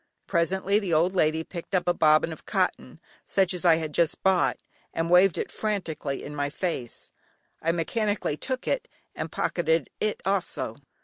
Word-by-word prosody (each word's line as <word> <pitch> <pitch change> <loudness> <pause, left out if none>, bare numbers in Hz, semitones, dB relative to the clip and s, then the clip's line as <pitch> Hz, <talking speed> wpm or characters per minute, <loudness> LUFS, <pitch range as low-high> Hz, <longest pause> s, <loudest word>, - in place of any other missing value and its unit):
Presently 190 +3 +1
the 185 -6 0
old 170 +4 +3
lady 160 -3 +2
picked 175 +3 -6
up 180 - +1
a 175 - +4
bobbin 155 +1 +4
of - - -12
cotton, - - -1 0.2
such 190 -2 +1
as 180 - -3
I 170 -2 +6
had 160 -2 -3
just 170 0 +1
bought, 190 -2 +3 0.4
and 165 +1 -1
waved 180 0 +6
it - - -3
frantically 180 -10 -3
in 150 - -7
my 145 -1 -1
face; 145 -7 -4 0.5
I 165 - +2
mechanically 205 +1 -1
took 255 - -4
it - - 0 0.3
and - - -5
pocketed 165 -1 0
it 215 -1 0
also. 175 - -1
170 Hz, 170 wpm, -27 LUFS, 160-190 Hz, 0.5 s, I